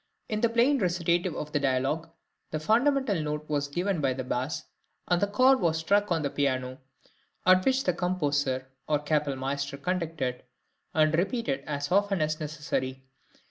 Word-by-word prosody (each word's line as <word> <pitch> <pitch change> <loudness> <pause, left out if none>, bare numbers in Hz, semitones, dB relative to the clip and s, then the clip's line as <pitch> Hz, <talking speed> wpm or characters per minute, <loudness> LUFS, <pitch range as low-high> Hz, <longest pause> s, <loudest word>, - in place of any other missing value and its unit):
In 215 -2 -2
the 235 - +3
plain 245 +5 +3
recitative 175 -2 +1
of 150 - -5
the 145 - +1
dialogue, 135 +5 0 0.4
the 155 - -3
fundamental 235 - +2
note 150 0 -3
was 145 -1 -1
given 175 +3 -1
by 135 -2 +2
the 130 0 -4
bass, 130 +6 -2 0.4
and 175 -1 +2
the 205 - +3
chord 255 +6 +4
was 160 -2 +2
struck 200 +5 +1
on 165 -2 +1
the 140 - 0
piano 130 -2 -1 0.7
(at 185 0 +6
which 265 +3 +2
the 180 - +1
composer 145 -7 0 0.2
or 150 - +3
kapellmeister 140 -2 -1
conducted) 160 -6 -2 0.5
and 155 0 +4
repeated 170 - -1
as 145 0 -3
often 200 0 +2
as 155 0 0
necessary. 145 -4 -3
155 Hz, 160 wpm, -28 LUFS, 140-185 Hz, 0.7 s, at